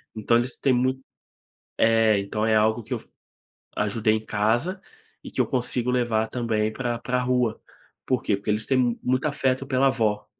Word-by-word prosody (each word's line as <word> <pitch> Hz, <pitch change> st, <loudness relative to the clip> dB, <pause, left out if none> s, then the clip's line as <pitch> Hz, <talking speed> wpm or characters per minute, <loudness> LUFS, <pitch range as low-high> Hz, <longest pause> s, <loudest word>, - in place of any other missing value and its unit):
Então 115 Hz, +2 st, +2 dB
eles 120 Hz, +1 st, -2 dB
têm 135 Hz, -2 st, +2 dB
muito 130 Hz, +2 st, +1 dB, 0.8 s
É, 115 Hz, -2 st, +4 dB
então 105 Hz, +2 st, -2 dB
é 110 Hz, -, +3 dB
algo 110 Hz, +2 st, +2 dB
que -, -, -5 dB
eu -, -, -1 dB
f -, -, -19 dB, 0.7 s
ajudei 110 Hz, +1 st, +1 dB
em 110 Hz, -, -4 dB
casa, 120 Hz, -, 0 dB, 0.4 s
e -, -, -8 dB
que -, -, -6 dB
eu -, -, +1 dB
consigo 125 Hz, -1 st, 0 dB
levar 120 Hz, -3 st, +1 dB
também 110 Hz, -3 st, -1 dB
pra 120 Hz, -2 st, -2 dB
pra 125 Hz, +1 st, -1 dB
rua. 125 Hz, -3 st, 0 dB, 0.4 s
Por 130 Hz, -3 st, 0 dB
quê? 100 Hz, -, +1 dB
Porque 105 Hz, +2 st, -7 dB
eles 105 Hz, +1 st, +1 dB
têm 125 Hz, -3 st, +1 dB
muito 130 Hz, +2 st, 0 dB
afeto 135 Hz, -2 st, 0 dB
pela 135 Hz, 0 st, +3 dB
avó. 110 Hz, -6 st, 0 dB
120 Hz, 185 wpm, -24 LUFS, 110-130 Hz, 0.8 s, É